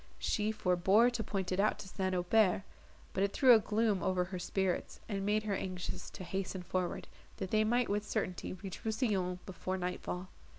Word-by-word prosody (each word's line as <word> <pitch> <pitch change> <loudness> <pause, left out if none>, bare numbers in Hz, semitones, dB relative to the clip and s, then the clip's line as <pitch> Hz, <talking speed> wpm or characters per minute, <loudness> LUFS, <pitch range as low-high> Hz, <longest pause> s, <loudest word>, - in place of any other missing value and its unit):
She 210 0 0
forbore 195 +3 +4
to 240 -2 -2
point 190 -3 -2
it 185 - 0
out 210 +2 +3
to 195 - -8
St. 185 0 -1
Aubert, 185 +1 +3 0.5
but 195 - +1
it 200 - 0
threw 260 -3 +7
a 225 - +7
gloom 215 -2 +1
over 185 -1 +1
her 180 0 -5
spirits, 190 0 -1
and 195 -3 -2
made 210 +1 +1
her 210 -2 -1
anxious 185 -2 -4
to - - -8
hasten 185 +1 -3
forward, 180 0 -2 0.3
that 190 -1 -4
they 215 0 +4
might 240 +2 +2
with 205 +1 0
certainty 185 -3 -2
reach 185 -2 -8
Rousillon 210 -5 0
before 185 0 -3
night 180 0 -3
fall. 180 +1 -5
195 Hz, 195 wpm, -33 LUFS, 185-215 Hz, 0.5 s, threw